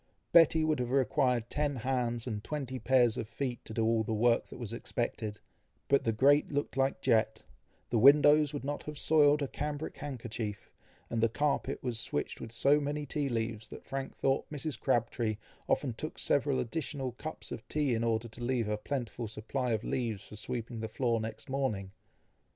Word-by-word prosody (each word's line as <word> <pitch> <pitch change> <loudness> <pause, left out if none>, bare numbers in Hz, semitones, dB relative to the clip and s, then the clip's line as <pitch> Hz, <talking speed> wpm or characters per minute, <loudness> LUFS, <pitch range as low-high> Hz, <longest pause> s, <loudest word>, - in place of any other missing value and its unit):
Betty 165 -1 +6
would 155 -3 +1
have 125 -1 -1
required 125 -2 +2
ten 145 +1 -1
hands, 120 -2 -1
and 105 -4 -4
twenty 135 -4 -4
pair 130 -1 +4
of 110 -2 -2
feet, 120 +2 -4
to - - -7
do 115 - +1
all 115 0 +3
the 110 +1 -2
work 115 +2 +3
that - - -10
was 115 -3 -4
expected; 115 -3 -3 0.5
but 140 - +3
the 115 - +3
grate 140 +6 +4
looked 145 0 -2
like 135 0 +1
jet, 110 -3 +2 0.5
the 115 - +3
windows 145 +3 +7
would 145 -4 -5
not 145 +1 -3
have 150 -1 -6
soiled 150 -1 +5
a - - -1
cambric 150 +3 -4
handkerchief, 115 -6 -5 0.4
and 115 - 0
the 115 - +4
carpet 145 +5 -1
was 120 -3 +1
switched 75 - -2
with 110 - -7
so 140 +6 +4
many 145 +1 -2
tea 145 0 -1
leaves, 110 -2 -2
that - - -11
Frank 135 -1 -5
thought 135 0 0
Mrs. 150 -3 -4
Crabtree 115 -3 0 0.3
often 130 -5 +1
took 155 +7 -6
several 140 -1 +1
additional 135 0 -3
cups 155 +6 -8
of - - -7
tea 145 -4 +1
in 115 0 0
order 115 0 0
to 115 +2 -9
leave 120 -3 0
a 105 0 0
plentiful 120 -1 -4
supply 115 +4 -3
of 110 0 0
leaves 115 -6 -2
for 105 - -11
sweeping 115 +2 -4
the 110 0 -4
floor 115 0 0
next 110 0 -6
morning. 120 -8 -2
125 Hz, 190 wpm, -31 LUFS, 115-145 Hz, 0.5 s, windows